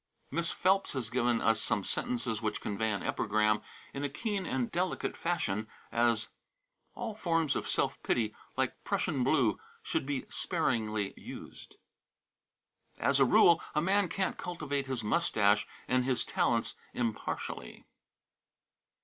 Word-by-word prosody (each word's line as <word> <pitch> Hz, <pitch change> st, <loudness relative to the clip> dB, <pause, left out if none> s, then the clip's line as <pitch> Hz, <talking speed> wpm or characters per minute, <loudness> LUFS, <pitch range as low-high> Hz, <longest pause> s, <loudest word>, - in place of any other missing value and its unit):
Miss 170 Hz, 0 st, 0 dB
Phelps 195 Hz, +1 st, +2 dB
has 125 Hz, -4 st, -3 dB
given 120 Hz, -2 st, +2 dB
us 115 Hz, 0 st, +3 dB
some 105 Hz, -3 st, 0 dB
sentences 115 Hz, -1 st, -1 dB
which 110 Hz, -2 st, -1 dB
convey 110 Hz, +2 st, -1 dB
an 100 Hz, -, -2 dB
epigram 105 Hz, 0 st, +2 dB, 0.3 s
in 140 Hz, -, -4 dB
a 145 Hz, -, 0 dB
keen 200 Hz, -, -2 dB
and 125 Hz, -3 st, -1 dB
delicate 180 Hz, +1 st, -1 dB
fashion, 110 Hz, -, -1 dB, 0.2 s
as: 115 Hz, -2 st, +2 dB, 0.7 s
"All 235 Hz, -2 st, -4 dB
forms 165 Hz, -7 st, +1 dB
of -, -, -2 dB
self -, -, 0 dB
pity, 110 Hz, -2 st, 0 dB, 0.2 s
like -, -, -1 dB
Prussian 135 Hz, -5 st, 0 dB
blue, 125 Hz, -6 st, +3 dB, 0.2 s
should -, -, -1 dB
be 140 Hz, -3 st, -2 dB
sparingly 110 Hz, -, 0 dB
used." -, -, -10 dB, 1.2 s
"As -, -, +2 dB
a -, -, +7 dB
rule, 170 Hz, -, +6 dB
a 150 Hz, -, +3 dB
man 195 Hz, 0 st, +3 dB
can't 190 Hz, +2 st, -1 dB
cultivate 145 Hz, -6 st, -3 dB
his 130 Hz, -4 st, -2 dB
mustache 105 Hz, -6 st, +3 dB, 0.2 s
and 125 Hz, 0 st, +3 dB
his 130 Hz, -1 st, +1 dB
talents -, -, +1 dB, 0.2 s
impartially." 115 Hz, -3 st, -3 dB
130 Hz, 135 wpm, -32 LUFS, 110-165 Hz, 1.2 s, a